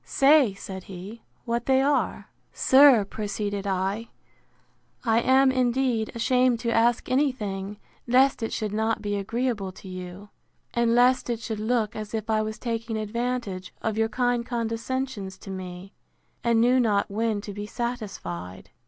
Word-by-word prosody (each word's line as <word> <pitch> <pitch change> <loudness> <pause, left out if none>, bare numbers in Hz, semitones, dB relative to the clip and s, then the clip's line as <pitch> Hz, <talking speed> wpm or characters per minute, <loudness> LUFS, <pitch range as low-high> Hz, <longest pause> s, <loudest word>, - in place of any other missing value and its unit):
Say, 275 -7 +4
said 190 -1 -8
he, 195 +5 -9 0.2
what 235 0 -2
they 265 0 +4
are. 280 +2 0 0.2
Sir, 260 -5 +6
proceeded 205 -1 -4
I, 195 +4 -1 0.9
I 225 -1 +3
am, 265 +2 +4
indeed, 250 -3 +1
ashamed 250 0 +2
to 235 - -1
ask 235 +1 +2
any 270 +2 +2
thing, 205 -4 -5 0.3
lest 260 +2 +4
it 225 - -2
should 215 -2 -3
not 220 +1 0
be 205 0 -1
agreeable 210 -1 -2
to 190 - -13
you; 185 +2 -8 0.4
and 235 -1 +2
lest 250 +1 +4
it 235 -2 -1
should 220 -2 -4
look 220 -1 0
as 215 +1 -5
if 220 0 -3
I 215 0 +2
was 215 0 -4
taking 230 -2 -3
advantage 215 -3 -3
of 220 -1 -1
your 225 0 +1
kind 245 -1 0
condescensions 230 -3 -3
to 195 - -9
me, 185 +1 -8 0.5
and 235 -1 +3
knew 250 +3 +4
not 210 -5 +1
when 220 0 0
to 205 -1 -7
be 205 +1 -6
satisfied! 200 - -5
225 Hz, 155 wpm, -26 LUFS, 205-245 Hz, 0.9 s, Sir